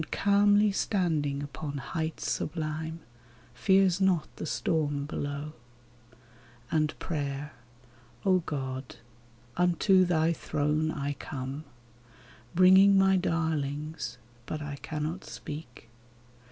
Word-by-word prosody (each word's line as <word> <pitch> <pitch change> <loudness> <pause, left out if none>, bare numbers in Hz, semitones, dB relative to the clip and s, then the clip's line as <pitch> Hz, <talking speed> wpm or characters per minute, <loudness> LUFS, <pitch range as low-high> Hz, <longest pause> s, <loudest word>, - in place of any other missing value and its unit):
And - - -10
calmly 205 +1 +4
standing 160 -9 0
upon 145 0 -5
heights 160 +4 -3
sublime. 160 +1 -3 0.5
Fears 190 -2 +3
not 185 -5 +3
the - - -4
storm 145 +3 0
below. 145 +1 -4 1.2
And 155 -1 +1
prayer! 145 -2 -4 0.7
O 185 -1 +5
God! 130 -5 -5 0.6
unto 180 +2 +4
thy 165 -1 +2
throne 150 0 0
I 145 -2 -2
come, 140 +1 -6 0.9
Bringing 190 +2 +7
my 195 0 +5
darlings 155 -7 -2
— 120 -1 -28
but 155 - -3
I 145 -1 -5
cannot 155 +5 -4
speak. 145 -6 -9
155 Hz, 100 wpm, -29 LUFS, 145-180 Hz, 1.2 s, Bringing